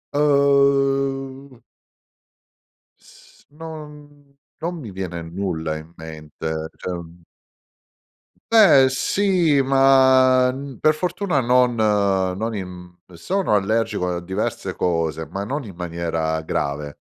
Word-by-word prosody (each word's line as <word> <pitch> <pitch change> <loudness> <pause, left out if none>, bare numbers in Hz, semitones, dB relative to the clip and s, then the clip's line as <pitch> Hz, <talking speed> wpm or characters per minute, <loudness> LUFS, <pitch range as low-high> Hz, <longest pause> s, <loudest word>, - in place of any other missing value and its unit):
Uhm 135 -2 +1 1.4
S - - -21
non 150 -2 -12 0.3
non 170 +1 -3
mi 115 -9 -8
viene 90 -3 -5
nulla 80 -2 -3
in 80 +2 -12
mente, 80 0 -6
cioè, 90 - -5
mhmm 85 0 -12 1.3
Beh, 190 -12 +7
sì, 170 0 +2
ma, 130 -1 +5
n 135 0 -8
per 155 - +4
fortuna 180 -1 -1
non 125 0 +3
non 100 -1 0
in 90 -2 -8 0.2
sono 180 - -1
allergico 105 -2 0
a - - -6
diverse 95 +1 -4
cose, 80 -2 -1
ma 95 +6 -5
non 140 +7 -4
in 100 -6 -10
maniera 85 -2 -2
grave, 75 -1 -3
115 Hz, 105 wpm, -21 LUFS, 90-140 Hz, 1.4 s, Beh